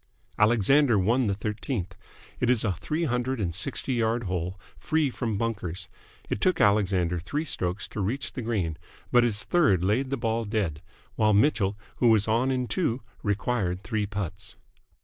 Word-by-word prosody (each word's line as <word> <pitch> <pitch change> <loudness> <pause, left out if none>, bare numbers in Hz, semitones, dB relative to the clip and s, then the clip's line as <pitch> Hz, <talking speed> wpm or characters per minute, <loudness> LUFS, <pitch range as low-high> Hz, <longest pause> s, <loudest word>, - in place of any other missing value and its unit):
Alexander 120 +4 +4
won 115 +6 +2
the 100 - +1
thirteenth. 105 -2 -4 0.4
It 125 - +1
is 125 -3 +3
a 105 - +1
three 155 - -3
hundred 125 -2 -1
and 90 -5 -1
sixty 95 +8 0
yard 115 0 +1
hole, 90 0 -3 0.2
free 155 -4 0
from 115 -4 -2
bunkers. 100 -6 -3 0.4
It 105 - -3
took 185 - +2
Alexander 95 -4 +2
three 145 - -3
strokes 90 - -2
to 105 - -4
reach 120 +9 -2
the 130 - -4
green, 95 -9 -2 0.3
but 120 0 +6
his 105 -4 -1
third 105 - +3
laid 115 +8 +1
the 135 - -1
ball 115 -1 -1
dead; 100 -8 -2 0.4
while 110 -1 +4
Mitchell, 105 -3 +2 0.2
who 120 - +3
was 110 -2 +4
on 115 +4 +2
in 130 -2 0
two, 135 - -1 0.2
required 100 -3 -1
three 110 -3 -1
putts. 105 -5 -5
110 Hz, 170 wpm, -27 LUFS, 95-125 Hz, 0.4 s, but